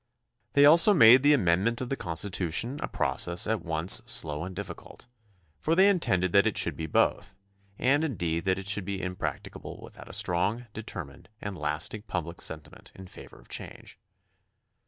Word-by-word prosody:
They 145 Hz, 0 st, +6 dB
also 170 Hz, +7 st, +7 dB
made 120 Hz, -3 st, +8 dB
the 145 Hz, +1 st, +5 dB
amendment 100 Hz, +2 st, +1 dB
of 125 Hz, -, -4 dB
the 135 Hz, -, -1 dB
Constitution 95 Hz, -, -3 dB
a -, -, -2 dB
process 85 Hz, 0 st, -1 dB
at 110 Hz, -2 st, -1 dB
once 85 Hz, +6 st, +2 dB
slow 80 Hz, -10 st, -1 dB
and 95 Hz, 0 st, -7 dB
difficult, 100 Hz, +1 st, -9 dB, 0.5 s
for 160 Hz, -, 0 dB
they 190 Hz, +3 st, +6 dB
intended 95 Hz, -, +1 dB
that 100 Hz, +3 st, +4 dB
it 110 Hz, -, -2 dB
should -, -, 0 dB
be 80 Hz, -, -5 dB
both, -, -, 0 dB, 0.4 s
and 140 Hz, +4 st, +2 dB
indeed 85 Hz, -, -2 dB
that 95 Hz, 0 st, +1 dB
it 95 Hz, -, -7 dB
should 100 Hz, 0 st, -1 dB
be 100 Hz, 0 st, -4 dB
impracticable 90 Hz, -1 st, -6 dB
without -, -, -13 dB
a -, -, -10 dB
strong, 100 Hz, +8 st, -1 dB
deter 105 Hz, -5 st, -6 dB
mined, 70 Hz, +6 st, -17 dB
and 100 Hz, -2 st, -6 dB
lasting 75 Hz, +7 st, -3 dB
public 85 Hz, -1 st, -4 dB
sentiment 80 Hz, -2 st, -6 dB
in 95 Hz, -, -11 dB
favor 90 Hz, -, -13 dB
of -, -, -19 dB
change. -, -, -8 dB
95 Hz, 175 wpm, -27 LUFS, 85-120 Hz, 0.5 s, made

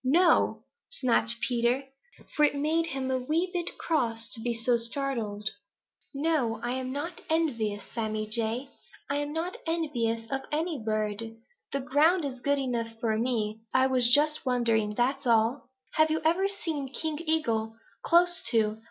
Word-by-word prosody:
"No!" 340 Hz, +7 st, +3 dB, 0.3 s
snapped 235 Hz, -, +1 dB
Peter, 245 Hz, +1 st, +1 dB, 0.5 s
for 300 Hz, -, +3 dB
it 290 Hz, -, +4 dB
made 315 Hz, +3 st, +1 dB
him 265 Hz, -3 st, -3 dB
a 260 Hz, -, +1 dB
wee 320 Hz, +8 st, 0 dB
bit 345 Hz, -1 st, -3 dB
cross 230 Hz, -8 st, -1 dB
to -, -, -1 dB
be 240 Hz, +1 st, -1 dB
so 235 Hz, +1 st, +1 dB
startled. 230 Hz, -4 st, -1 dB, 0.6 s
"No, 275 Hz, -7 st, 0 dB
I'm 255 Hz, +1 st, -2 dB
not 315 Hz, +6 st, -5 dB
envious, 230 Hz, -11 st, 0 dB
Sammy 215 Hz, -2 st, -2 dB
Jay. 230 Hz, +4 st, 0 dB, 0.4 s
I'm 290 Hz, +1 st, -1 dB
not 330 Hz, +4 st, -3 dB
envious 240 Hz, -9 st, -1 dB
of 270 Hz, 0 st, -1 dB
any 310 Hz, -2 st, -1 dB
bird. 215 Hz, +1 st, -2 dB, 0.3 s
The 275 Hz, -, -1 dB
ground 300 Hz, +6 st, +3 dB
is 260 Hz, -3 st, -5 dB
good 285 Hz, +1 st, +2 dB
enough 230 Hz, -4 st, -3 dB
for 225 Hz, -2 st, 0 dB
me. 220 Hz, -3 st, -1 dB, 0.2 s
I 260 Hz, 0 st, +5 dB
was 250 Hz, -2 st, +3 dB
just 300 Hz, +3 st, +3 dB
wondering, 230 Hz, -4 st, +1 dB
that's 255 Hz, +3 st, 0 dB
all." 230 Hz, +4 st, +2 dB, 0.2 s
"Have 310 Hz, 0 st, +4 dB
you 315 Hz, 0 st, +1 dB
ever 355 Hz, +5 st, +3 dB
seen 320 Hz, -9 st, -3 dB
King 310 Hz, +1 st, -2 dB
Eagle 230 Hz, -9 st, 0 dB, 0.3 s
close 350 Hz, +1 st, +4 dB
to?" 220 Hz, -2 st, +2 dB
260 Hz, 150 wpm, -28 LUFS, 230-305 Hz, 0.6 s, I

